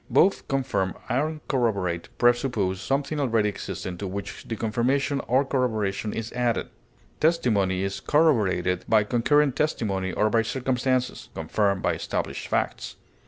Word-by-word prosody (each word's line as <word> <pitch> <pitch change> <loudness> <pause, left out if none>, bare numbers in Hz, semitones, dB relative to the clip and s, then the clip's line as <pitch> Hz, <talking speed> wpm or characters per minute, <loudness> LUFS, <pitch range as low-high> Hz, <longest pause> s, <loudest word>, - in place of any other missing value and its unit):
Both 195 - +3
confirm 130 -9 -1
and 150 +4 -1
corroborate 100 - 0
presuppose 120 -6 +2
something 145 +2 -1
already 115 -6 +2
existing 95 -3 -6
to 100 - -3
which 100 +1 -6
the 115 - -3
confirmation 130 +6 0
or 130 +4 +3
corroboration 110 -6 -1
is 115 +1 -5
added. 120 -2 0 0.5
Testimony 105 - +2
is 95 0 -3
corroborated 100 - +2
by 110 -1 +5
concurrent 135 +5 +2
testimony 100 -11 -1
or 105 +4 +1
by 115 - +4
circumstances; 125 +1 -1
confirmed 100 +4 0
by - - +2
established - - -3
facts. - - -2
115 Hz, 130 wpm, -25 LUFS, 100-135 Hz, 0.5 s, by